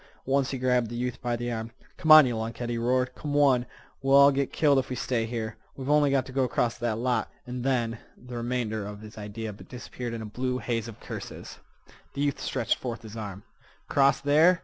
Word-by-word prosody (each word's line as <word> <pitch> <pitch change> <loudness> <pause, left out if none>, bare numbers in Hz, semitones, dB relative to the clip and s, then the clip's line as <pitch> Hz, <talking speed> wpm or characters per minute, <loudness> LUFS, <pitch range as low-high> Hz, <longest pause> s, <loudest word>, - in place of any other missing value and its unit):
Once 135 0 +2
he 135 - -3
grabbed 125 -2 +1
the 120 - -6
youth 125 0 -3
by 120 -2 -1
the 120 +1 -3
arm. 110 -1 -4 0.3
"Come 160 -4 +2
on, 155 -2 +11
yeh 125 - -1
lunkhead!" 115 +2 -3
he 120 - -1
roared. 125 +2 +1
"Come 145 +2 -4
on! 130 -4 +4 0.3
We'll 135 +1 +5
all 140 0 +8
git 140 -1 -1
killed 145 -3 +4
if 130 - -3
we 130 - -2
stay 120 -3 -1
here. 110 -2 -4 0.2
We've 135 +1 -2
on'y 150 -1 +5
got 135 -2 +2
t' 130 - -10
go 135 0 +2
across 120 -1 0
that 120 -2 -1
lot. 125 +1 0
An' 125 0 -5
then"—the 120 -1 -3
remainder 120 -3 -2
of 105 +1 -7
his 110 0 -11
idea 105 +1 -5
disappeared 120 +2 -7
in 115 - -5
a - - -6
blue 125 +4 -2
haze 115 -2 -2
of 115 - -10
curses. - - -8 0.6
The 140 - -2
youth 145 -1 0
stretched 120 -4 0
forth 120 -2 -5
his 110 0 -9
arm. 100 -3 -6 0.4
"Cross 140 0 +3
there?" 160 +5 +5
125 Hz, 215 wpm, -27 LUFS, 115-135 Hz, 0.6 s, on